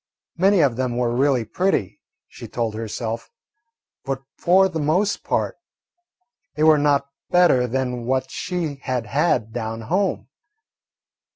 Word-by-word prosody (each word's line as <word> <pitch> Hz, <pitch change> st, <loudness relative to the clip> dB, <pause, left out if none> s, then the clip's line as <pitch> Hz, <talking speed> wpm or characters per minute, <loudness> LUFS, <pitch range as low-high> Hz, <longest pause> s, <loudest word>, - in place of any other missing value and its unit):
Many 190 Hz, +1 st, +4 dB
of 130 Hz, -6 st, +2 dB
them 125 Hz, -2 st, -1 dB
were 120 Hz, -1 st, 0 dB
really 130 Hz, -3 st, +2 dB
pretty, 180 Hz, -, -1 dB, 0.3 s
she -, -, -10 dB
told 115 Hz, -2 st, -2 dB
herself, 110 Hz, +1 st, -4 dB, 0.7 s
but 135 Hz, 0 st, -4 dB
for 190 Hz, +2 st, +4 dB
the 170 Hz, -4 st, -4 dB
most 175 Hz, +8 st, +1 dB
part -, -, -1 dB, 1.0 s
they 155 Hz, -, 0 dB
were 155 Hz, -1 st, +6 dB
not 140 Hz, -1 st, +1 dB, 0.2 s
better 175 Hz, -9 st, +4 dB
than 125 Hz, -1 st, -2 dB
what 130 Hz, 0 st, 0 dB
she 170 Hz, -6 st, -3 dB
had 125 Hz, -3 st, -2 dB
had 120 Hz, -3 st, 0 dB
down 115 Hz, -1 st, -4 dB
home. 155 Hz, -, -1 dB
130 Hz, 130 wpm, -22 LUFS, 120-160 Hz, 1.0 s, were